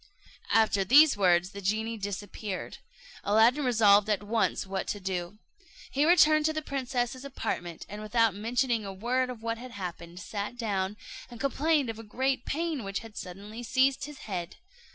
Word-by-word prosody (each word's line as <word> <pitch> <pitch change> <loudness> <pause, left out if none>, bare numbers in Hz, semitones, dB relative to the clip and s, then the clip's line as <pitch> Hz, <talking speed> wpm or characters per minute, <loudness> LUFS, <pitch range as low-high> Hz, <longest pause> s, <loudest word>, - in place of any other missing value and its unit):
After 220 -3 +3
these 285 +9 +7
words 180 -2 +3
the 200 - -8
genie 220 +4 -1
disappeared. 205 -1 -5 0.4
Aladdin 225 +8 +4
resolved 215 -4 +5
at 210 -1 +1
once 220 0 0
what 190 0 -3
to 205 - -3
do. 185 0 -4 0.5
He 285 +2 +2
returned 310 -3 +5
to 315 - +2
the 310 0 -3
princess's 260 -2 -2
apartment, 175 -11 -4
and 210 +1 -7
without 225 0 +2
mentioning 230 +2 0
a 195 - -5
word 245 +6 -1
of 235 -3 -8
what 230 0 -2
had 255 +1 -8
happened, 175 -3 -7
sat 205 +4 -5
down, 205 -3 -2 0.3
and 240 -2 -11
complained 280 0 +1
of 225 - -11
a - - -8
great 260 +4 -1
pain 320 -3 -2
which 195 0 -3
had 225 -2 -12
suddenly 200 +5 -8
seized 265 +3 +2
his 295 -2 -10
head. 180 -4 -4
225 Hz, 170 wpm, -29 LUFS, 200-260 Hz, 0.5 s, these